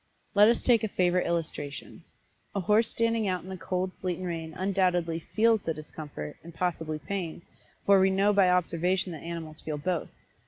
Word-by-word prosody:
Let 205 Hz, 0 st, +7 dB
us 235 Hz, 0 st, +2 dB
take 235 Hz, -3 st, +4 dB
a -, -, +2 dB
favorite 180 Hz, -2 st, +1 dB
illustration. 155 Hz, -4 st, -4 dB, 0.5 s
A -, -, +1 dB
horse 210 Hz, +5 st, +3 dB
standing 230 Hz, -2 st, +1 dB
out 185 Hz, -2 st, -1 dB
in 185 Hz, -, -10 dB
the 190 Hz, -, -4 dB
cold 185 Hz, +1 st, -2 dB
sleet 180 Hz, -2 st, -1 dB
and 185 Hz, -, -5 dB
rain 165 Hz, -2 st, -4 dB
undoubtedly 180 Hz, -3 st, +1 dB
feels 220 Hz, +6 st, +2 dB
the 165 Hz, -3 st, -2 dB
discomfort, 150 Hz, -, -8 dB
and 170 Hz, 0 st, -11 dB
possibly 165 Hz, -3 st, -1 dB
pain, 170 Hz, +1 st, -5 dB, 0.4 s
for 200 Hz, -1 st, +6 dB
we 190 Hz, 0 st, +5 dB
know 195 Hz, +2 st, +3 dB
by 195 Hz, -2 st, +5 dB
observation 180 Hz, +1 st, +1 dB
that 160 Hz, -, -7 dB
animals 165 Hz, -2 st, -6 dB
feel 155 Hz, -1 st, -4 dB
both. 170 Hz, +2 st, -2 dB
180 Hz, 185 wpm, -28 LUFS, 165-195 Hz, 0.5 s, Let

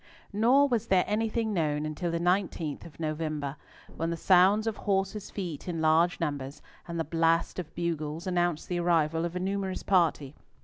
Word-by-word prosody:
Nor 250 Hz, +7 st, +4 dB
was 230 Hz, -4 st, -1 dB
there 185 Hz, -1 st, +4 dB
anything 220 Hz, +1 st, -1 dB
known 150 Hz, -4 st, 0 dB
until 155 Hz, +3 st, -3 dB
the 170 Hz, -, -1 dB
19th 175 Hz, -4 st, -1 dB
of 160 Hz, -, -17 dB
November, 155 Hz, -3 st, -3 dB, 0.4 s
when 165 Hz, +1 st, -1 dB
the 170 Hz, -, -2 dB
sound 190 Hz, +5 st, +4 dB
of 225 Hz, -2 st, -2 dB
horses' 195 Hz, +1 st, -1 dB
feet 175 Hz, -7 st, -6 dB
in 170 Hz, -2 st, -3 dB
large 160 Hz, +2 st, +3 dB
numbers, 145 Hz, -3 st, -3 dB, 0.3 s
and 170 Hz, -1 st, -4 dB
the -, -, +1 dB
blast 165 Hz, +3 st, +1 dB
of 170 Hz, -4 st, -7 dB
bugles, 165 Hz, -2 st, -3 dB
announced 175 Hz, -3 st, 0 dB
the 175 Hz, -1 st, -2 dB
arrival 165 Hz, -1 st, +2 dB
of 170 Hz, +1 st, -5 dB
a -, -, -1 dB
numerous 190 Hz, 0 st, -2 dB
party. 165 Hz, -7 st, +2 dB
170 Hz, 175 wpm, -28 LUFS, 155-190 Hz, 0.4 s, Nor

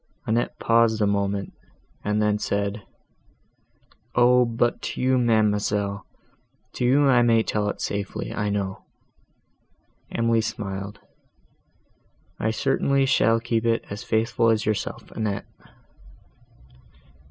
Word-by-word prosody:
Annette 115 Hz, +2 st, -1 dB
paused 115 Hz, -1 st, +3 dB
a 105 Hz, -, +3 dB
moment, 100 Hz, -1 st, -1 dB, 0.5 s
and 105 Hz, +1 st, 0 dB
then 105 Hz, 0 st, +1 dB
said, 100 Hz, +1 st, -2 dB, 1.3 s
"O, 125 Hz, +1 st, +5 dB
but 120 Hz, +1 st, 0 dB
to -, -, -5 dB
you, 130 Hz, 0 st, +2 dB
ma'amselle, 105 Hz, -3 st, +1 dB, 0.7 s
to -, -, -3 dB
you 140 Hz, +3 st, +4 dB
I 125 Hz, -3 st, +5 dB
may 115 Hz, -2 st, +4 dB
tell 105 Hz, -1 st, -1 dB
it -, -, -5 dB
safely, 100 Hz, 0 st, -4 dB
I 105 Hz, 0 st, -1 dB
know." 100 Hz, -2 st, -3 dB, 1.3 s
Emily 115 Hz, -1 st, +2 dB
smiled, 100 Hz, -2 st, -5 dB, 1.4 s
"I 110 Hz, -, 0 dB
certainly 135 Hz, +3 st, +1 dB
shall 115 Hz, -3 st, +3 dB
keep 115 Hz, -1 st, -1 dB
it 115 Hz, -1 st, +1 dB
as 100 Hz, 0 st, -5 dB
faithful 115 Hz, +1 st, +1 dB
as 110 Hz, -1 st, +1 dB
yourself, 110 Hz, -2 st, -3 dB
Annette." 105 Hz, -3 st, -3 dB
110 Hz, 115 wpm, -24 LUFS, 105-115 Hz, 1.4 s, O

